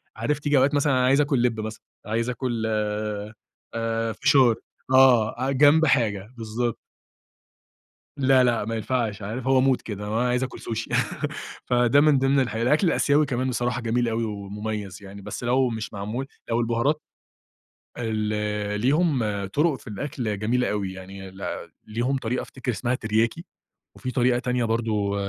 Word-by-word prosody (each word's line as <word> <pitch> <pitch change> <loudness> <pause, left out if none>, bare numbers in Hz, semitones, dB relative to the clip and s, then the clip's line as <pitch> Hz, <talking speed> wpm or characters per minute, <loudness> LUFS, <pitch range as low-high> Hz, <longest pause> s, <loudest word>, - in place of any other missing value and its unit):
عارف 140 +7 -1
تييجي 145 -1 +2
أوقات 135 +2 +4
مثلًا 145 -1 +2
أنا 130 -1 +3
عايز 135 +3 +4
أكل 140 -4 +1
لب 115 -3 +1
مثلًا، 110 0 -5 0.2
عايز 115 +3 -1
أكل، 120 -2 -2 1.1
آآ، 115 0 -1
فشار. 125 +2 +4 0.4
آه 130 0 +5
جنب 145 +4 +5
حاجة، 115 -6 +1
بالضبط. 115 +1 -2 1.4
لأ 130 -2 +4
لأ 120 -3 +1
ما 115 +2 -3
ينفعش 110 -2 -2
عارف 115 +5 -5
هو 135 -1 +4
مود 130 -1 +3
كده 105 -1 -6
هو 110 +2 -1
عايز 125 +1 +1
أكل 130 - -7
سوشي 115 0 -4 0.7
فده 125 +2 +4
من 150 -2 +5
ضمن 135 +1 +3
الح 130 -3 -1
الأكل 125 - +2
الآسيوي 150 -2 +3
كمان 130 -1 -1
بصراحة 125 0 -1
جميل 120 +1 0
أوي 115 0 -1
ومميز 105 -1 -5
يعني، 100 0 -10
بس 105 +4 -6
لو 130 +2 +3
مش 110 -1 -5
معمول 110 +6 -4 0.2
لو 115 +1 +2
البهارات 120 +6 +1 1.0
ال 105 -2 -2
ليهم 150 +2 +2 0.3
طرق 145 - +1
في - - -17
الأكل 110 -2 -3
جميلة 125 +4 +1
أوي 100 -3 -2
يعني 95 0 -9 0.6
ليهم 120 +5 -1
طريقة 125 0 -2
أفتكر 130 -1 -4
اسمها 120 +3 -1
ترياكي 115 +8 0 0.5
وفي 130 - -4
طريقة 125 -1 +2
تانية 125 0 0
برضو 110 -3 0
120 Hz, 150 wpm, -25 LUFS, 110-130 Hz, 1.4 s, آه